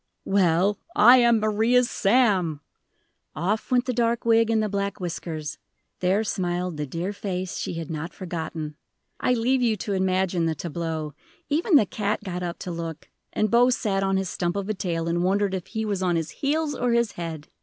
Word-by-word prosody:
"Well 195 +1 +2 0.2
I 240 +5 +8
am 235 -2 +5
Maria's 220 +4 +3
Sam!" 195 - +2 0.7
Off 195 +8 -1
went 250 -1 +2
the 255 - -1
dark 235 0 0
wig 230 -1 +4
and 220 -1 +2
the - - 0
black 200 0 -2
whiskers 160 -4 -5 0.4
there 190 +4 +2
smiled 180 -4 -2
the 150 -1 -3
dear 170 +8 -3
face 185 -3 -4
she - - -3
had 165 -1 -5
not 160 +3 -4
forgotten! 160 -4 -5 0.4
I 250 - +2
leave 250 +3 +1
you 225 -3 +2
to 200 +1 -3
imagine 185 -2 +1
the 160 - -1
tableau; 160 -1 -4 0.4
even 320 +4 +2
the 230 - +6
cat 205 +1 -2
got 180 -3 -4
up 175 -1 -4
to 180 - -4
look, 165 -2 -6 0.2
and 215 -2 0
Bose 245 +1 +4
sat 195 -4 0
on 195 0 +1
his 190 0 -1
stump 175 0 -2
of 200 0 -3
a - - +1
tail, 170 -4 -2
and 170 +1 0
wondered 195 +1 +1
if 185 -2 -4
he 220 -1 -3
was 200 -3 -2
on 180 -2 +1
his 165 -1 -2
heels 300 +1 -1
or 245 -3 0
his 235 -2 +2
head. 165 -3 -6
195 Hz, 195 wpm, -25 LUFS, 170-225 Hz, 0.7 s, I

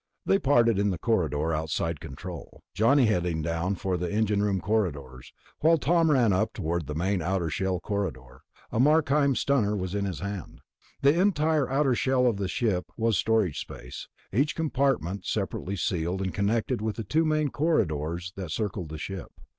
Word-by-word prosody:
They 195 - +3
parted 120 - +3
in 100 0 +2
the 90 - -1
corridor 80 -6 0
outside 80 0 -2
control, 85 +6 -9
Johnny 120 +8 +4
heading 90 -7 0
down 85 +4 -1
for 95 0 -2
the 90 0 -3
engine 105 -1 +1
room 100 -2 +1
corridors, 75 - -2 0.3
while 165 +2 +4
Tom 165 +2 +2
ran 125 -8 +4
up 90 - 0
toward 85 -1 -2
the 75 - -4
main 95 +3 0
outer 85 -1 -1
shell 95 +2 -1
corridor, 85 - -4 0.3
a 110 - -1
Markheim 145 -1 +3
stunner 115 -8 +1
in 100 +2 -2
his 90 -6 -4
hand. 100 -2 -6 0.4
The 145 +5 +5
entire 155 -7 +2
outer 135 0 +2
shell 130 +1 +2
of 115 -5 +2
the 100 -1 -2
ship 95 -3 0
was 115 -1 +2
storage 110 -8 +1
space, - - -8 0.3
each 140 +8 +1
compartment 135 - 0
separately 100 - -2
sealed 90 0 -1
and 95 - -3
connected 110 +4 0
with 110 -1 -2
the 115 - -4
two 155 +10 +1
main 155 -2 +1
corridors 90 - -1
that 95 -4 -6
circled 95 -2 -3
the 80 - -6
ship. 95 +3 -6
100 Hz, 170 wpm, -27 LUFS, 85-130 Hz, 0.4 s, The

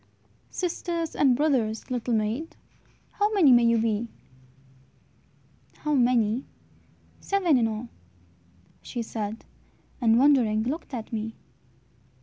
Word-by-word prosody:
"Sisters 340 -2 -3
and 265 -4 +4
brothers, 250 -6 0
little 245 -1 -1
maid, 220 +9 -2 0.6
How 415 +1 0
many 325 -9 +6
may 240 -1 +7
you 230 0 +4
be?" 225 0 0 1.7
"How 300 -1 -2
many? 245 -2 +2 0.8
Seven 375 -6 +1
in 235 -3 +3
all," 220 +2 -5 0.9
she 240 -2 -5
said, 220 -1 -5 0.6
And 225 -1 +4
wondering 245 -6 +3
looked 280 +2 -4
at 230 -1 -7
me. 225 0 -4
240 Hz, 110 wpm, -26 LUFS, 225-295 Hz, 1.7 s, may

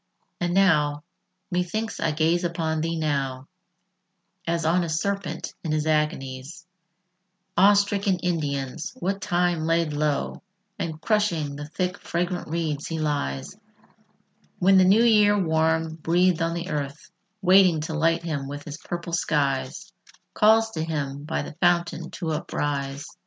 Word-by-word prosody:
III 175 - +1
And 175 - -2
now 150 -6 +3 0.5
methinks 180 +5 -2
I 165 - +1
gaze 160 +3 +1
upon 165 -2 -1
thee 165 +1 -1
now, 135 -4 -2 1.0
As 165 -1 0
on 175 +3 +3
a 170 - -3
serpent 195 +5 -2
in 160 - -2
his 155 0 0
agonies 150 0 -2 0.9
Awestricken 200 0 +4
Indians; 150 - -2
what 195 +2 -2
time 175 -2 +1
laid 165 -2 +1
low 150 -1 -1 0.4
And 160 -2 -3
crushing 170 -8 0
the 145 +1 -7
thick 180 +3 -3
fragrant 175 +1 -2
reeds 155 -3 -2
he 165 - -3
lies, 145 - -2 1.0
When 190 +1 +5
the 185 - +6
new 205 +5 +5
year 210 -3 +5
warm 160 -2 +1
breathèd 175 +2 +2
on 165 0 0
the 170 +2 -4
earth, 145 +3 -4 0.3
Waiting 185 -3 +5
to 160 +1 -4
light 165 +2 +1
him 150 -5 -3
with 145 +1 -6
his 150 0 -7
purple 170 0 -6
skies, 145 +2 -1 0.4
Calls 220 +1 +4
to 160 -6 -3
him 145 -3 -3
by 160 - -2
the - - -8
fountain 175 -1 +1
to 165 -3 -4
uprise. 145 -2 -3
165 Hz, 140 wpm, -25 LUFS, 150-180 Hz, 1.0 s, the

